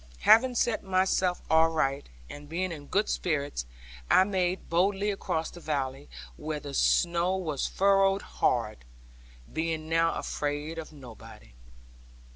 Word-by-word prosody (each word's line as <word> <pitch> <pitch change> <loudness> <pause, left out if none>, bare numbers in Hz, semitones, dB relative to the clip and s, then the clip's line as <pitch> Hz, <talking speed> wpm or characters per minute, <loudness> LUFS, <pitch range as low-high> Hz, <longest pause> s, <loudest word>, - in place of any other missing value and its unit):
Having 250 +3 +5
set 235 -1 0
myself 185 -1 +1
aright, 160 -4 +2 0.2
and 145 0 -11
being 180 +3 -2
in 145 -3 -8
good 205 +2 +1
spirits, 140 - -2 0.4
I - - +6
made 185 -2 -1
boldly 195 +4 +1
across 165 -4 -3
the 175 - -11
valley 140 -3 -3 0.3
(where 155 0 -4
the 145 -1 -8
snow 175 +5 +2
was 155 -7 -2
furrowed 195 0 +2
hard), - - -1 0.7
being 160 0 -2
now 165 0 +2
afraid 150 +2 -3
of 160 - -8
nobody. 115 - -13
165 Hz, 125 wpm, -28 LUFS, 145-190 Hz, 0.7 s, I